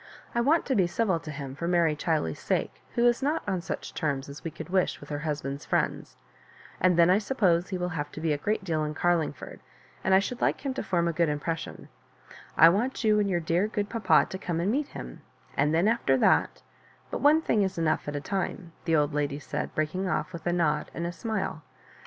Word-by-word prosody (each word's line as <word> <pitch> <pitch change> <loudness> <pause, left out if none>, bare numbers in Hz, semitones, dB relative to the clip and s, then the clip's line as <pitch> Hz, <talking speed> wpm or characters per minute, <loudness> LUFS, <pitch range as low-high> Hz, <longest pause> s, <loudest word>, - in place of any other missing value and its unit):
I 235 - +2
want 305 +7 +3
to 270 - 0
be 190 -5 +3
civil 185 -2 0
to 160 - -9
him 140 -3 -6
for 170 +5 -4
Mary 170 -3 +3
Chiley's 150 - -1
sake, - - -2
who 235 - +3
is 240 +1 +3
not 295 +4 0
on 190 -3 -1
such 175 - -5
terms 140 -4 -2
as 140 - -10
we 165 - -3
oould 160 +3 -9
wish 185 -1 +1
with - - -12
her 145 -1 -3
husband's 145 -2 -3
friends; - - -1 0.6
and 180 -1 +3
then 170 +1 +6
I 190 - +5
suppose 195 -7 +1
he 190 - -2
will 180 0 -2
have 150 -3 -4
to - - -7
be 160 -1 +1
a - - -1
great 210 +4 -1
deal 160 -4 -1
in 150 0 -3
Car 175 +3 +3
iingford, 155 -4 -4 0.4
and 190 - +4
I - - +8
should 220 +5 -2
like - - +1
him 270 - 0
to - - -3
form 175 -3 0
a 170 - 0
good 170 -1 +2
im 150 0 -1
pressioa 165 +1 -5 0.7
I 165 - +9
want 230 +10 +1
you 215 -1 +4
and 205 -1 +1
your 175 -2 0
dear 170 +5 +1
g^ 210 -2 -2
papa 195 -8 +3
to 190 - -5
come 170 -3 -2
and 185 +5 +1
meet 285 +4 0
him; - - -9 0.3
and 145 +2 +2
then 165 +5 +3
after 220 - +2
that^but - - -1
one 310 +2 +5
thing 215 - +2
is 190 -2 -1
enough 160 -3 0
at 145 - -3
a 145 - -2
time," 190 0 -3
the 165 - +2
old 150 -1 +2
lady 145 -1 -1
said, 150 - -5
breaking 180 +5 -1
off 185 - -2
with 170 0 -6
a - - +2
nod 170 -4 +1
and 170 - -3
a 170 - -2
smile. 200 -5 -3
170 Hz, 235 wpm, -28 LUFS, 155-200 Hz, 0.7 s, I